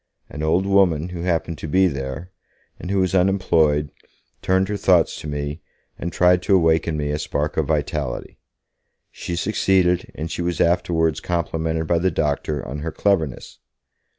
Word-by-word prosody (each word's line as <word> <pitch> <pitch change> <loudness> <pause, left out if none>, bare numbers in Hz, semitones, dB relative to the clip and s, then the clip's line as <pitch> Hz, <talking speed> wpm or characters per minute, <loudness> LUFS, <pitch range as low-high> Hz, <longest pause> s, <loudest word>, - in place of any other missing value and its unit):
An 75 - -6
old 85 +5 +1
woman 90 -5 +2
who 90 -1 -6
happened 85 -2 -1
to - - -5
be 95 +5 +3
there, 70 +4 -5 0.5
and - - -7
who 100 - 0
was 95 -1 +1
unemployed, 80 -6 +2 0.5
turned 95 +1 +2
her 105 - -2
thoughts 90 -4 +3
to - - -7
me, 75 +1 -4 0.4
and 85 - -4
tried 90 +1 +3
to 95 +1 +3
awake 80 -2 +3
in 80 -2 -1
me 75 -1 -2
a 75 - -2
spark 75 0 -2
of - - 0
vitality. 70 -6 -3 0.7
She 85 - -5
succeeded, 95 -2 +1
and 80 +1 -5
she - - -3
was 85 -1 -2
afterwards 85 -2 +1
complimented 80 -2 -2
by 85 +1 +1
the 95 +2 +2
doctor 75 -2 -2
on 70 +3 -5
her 80 +2 -4
cleverness. 80 -10 -1
85 Hz, 170 wpm, -22 LUFS, 75-90 Hz, 0.7 s, be